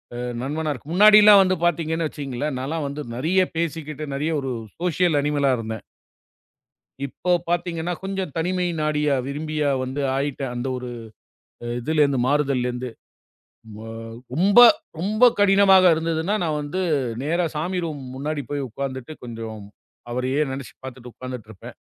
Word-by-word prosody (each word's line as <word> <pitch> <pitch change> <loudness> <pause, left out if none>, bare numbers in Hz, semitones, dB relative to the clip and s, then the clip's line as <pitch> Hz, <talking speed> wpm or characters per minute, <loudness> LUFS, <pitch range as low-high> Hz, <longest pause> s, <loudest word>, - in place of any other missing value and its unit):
அ - - -5 0.2
நண்பனா 150 +4 -2
இருக்கு. 140 +2 -12
முன்னாடிலாம் 210 +1 +8
வந்து 185 0 +1
பாத்தீங்கன்னு 165 -1 0
வச்சுக்கோங்களேன், 140 -1 -4
நான்லாம் 145 +4 -3
வந்து 140 +2 -5
நெறைய 165 +9 +2 0.2
பேசிக்கிட்டு 155 -2 -3
நெறைய 150 +4 -1
ஒரு 135 -1 -3 0.3
சோசியல் 175 -2 +2
அனிமலா 145 -1 +1
இருந்தேன். 110 -1 -5 1.2
இப்போ 180 +6 -3 0.2
பாத்தீங்கன்னா 175 0 -1
கொஞ்சம் 190 -3 -3
தனிமை 180 +2 0 0.2
நாடிய 150 -1 +1 0.2
விரும்பியா 150 +1 -2
வந்து 130 +3 -3 0.2
ஆயிட்டேன். 135 -2 -2
அந்த 120 +2 -3
ஒரு 125 0 -6 0.8
அ - - -5
இதுல 155 +5 +1
இருந்து 140 -2 +2
மாறுதல்ல 140 -3 +1
இருந்து 125 +1 -5 0.9
ப 110 - -10 0.5
ரொம்ப 195 +8 +5 0.4
ரொம்ப 210 +7 0 0.2
கடினமா 195 -1 +6 0.2
இருந்ததுன்னா, 165 +3 -1
நான் 155 -3 -1
வந்து 145 +6 -4 0.4
நேரா 170 +4 +1
சாமி 175 +5 -2
ரூம் 150 -4 -5
முன்னாடி 145 +2 -3
போய் 145 -1 -2
உக்காந்துட்டு 130 +3 -5
கொஞ்சம் 115 -2 -7 0.5
அவரையே 130 +3 -1
நெனைச்சு 135 -1 -7
பாத்துட்டு 125 -2 -9
உக்காந்துட்டுருப்பேன். 115 -6 -9
150 Hz, 135 wpm, -23 LUFS, 130-170 Hz, 1.2 s, முன்னாடிலாம்